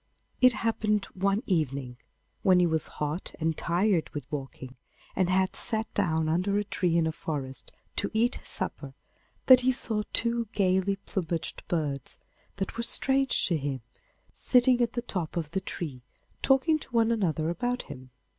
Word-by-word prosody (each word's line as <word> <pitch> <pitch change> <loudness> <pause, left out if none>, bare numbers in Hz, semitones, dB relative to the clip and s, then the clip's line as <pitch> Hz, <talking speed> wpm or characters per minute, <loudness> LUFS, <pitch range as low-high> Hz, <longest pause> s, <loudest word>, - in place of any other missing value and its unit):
It 255 -1 +7
happened 210 -2 +1
one 195 +4 0
evening, 140 -8 -1 0.4
when 185 -1 +5
he 180 - +4
was 160 -2 0
hot 150 +4 -3
and 160 0 0
tired 180 +1 +1
with 145 -4 -4
walking, 135 -2 -6 0.4
and 185 -2 +2
had 190 0 +2
sat 220 -1 -2
down 160 -5 +1
under 180 +5 +1
a 205 - +1
tree 180 -4 0
in 165 - +3
a 160 - 0
forest 140 -5 -5 0.3
to 200 - 0
eat 230 +3 +1
his - - -11
supper, - - -4 0.5
that 255 -1 +9
he 255 +1 +3
saw 225 -3 -1
two 235 -1 +1
gaily 190 0 +2
plumaged 170 -3 -3
birds, 145 -6 -2 0.4
that 195 +2 -4
were - - 0
strange 270 +2 +3
to 170 - +1
him, 140 -3 -3 0.5
sitting 250 -1 +3
at 235 -1 +1
the 240 - -2
top 180 -8 -4
of 155 -3 -3
the 190 - -1
tree 145 -10 -5 0.4
talking 280 +4 +3
to - - -10
one 230 -1 +3
another 165 -8 0
about 245 +7 -2
him. 130 -2 -10
185 Hz, 165 wpm, -28 LUFS, 160-225 Hz, 0.5 s, that